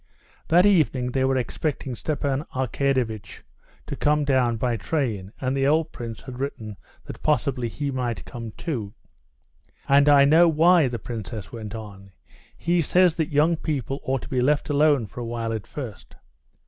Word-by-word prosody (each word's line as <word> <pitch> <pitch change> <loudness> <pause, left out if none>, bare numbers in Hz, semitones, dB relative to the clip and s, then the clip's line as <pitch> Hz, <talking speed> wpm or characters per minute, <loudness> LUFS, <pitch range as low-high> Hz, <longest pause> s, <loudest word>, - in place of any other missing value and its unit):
That 175 +3 +5
evening 150 -10 +2
they 130 +1 0
were 135 0 +1
expecting 135 +1 -3
Stepan 140 +2 -2
Arkadyevitch 130 -4 -1 0.4
to - - -5
come 150 0 +2
down 130 -4 +2
by 120 +1 0
train, 110 - -2
and 130 0 -1
the 135 0 +1
old 160 +2 +2
prince 115 -2 -7
had 130 -2 -9
written 115 -6 -5 0.3
that - - -9
possibly 140 -5 0
he 140 +5 -3
might 125 -3 -3
come 115 -2 -7
too. 115 - -4 0.9
"And 140 +1 +5
I 140 -1 +7
know 160 +4 +6
why," 165 0 +5
the 120 -1 -3
princess 110 -2 -7
went 110 -2 -7
on; 100 -3 -10 0.4
"he 170 0 +1
says 180 +2 +4
that 160 -2 0
young 155 +3 +3
people 140 -4 -3
ought 135 0 -2
to - - -8
be 130 -2 0
left 145 +2 +1
alone 145 -4 +3
for 105 - -10
a 120 - -4
while 115 -1 -3
at 110 -2 -5
first." 125 -9 -8
130 Hz, 170 wpm, -24 LUFS, 115-150 Hz, 0.9 s, I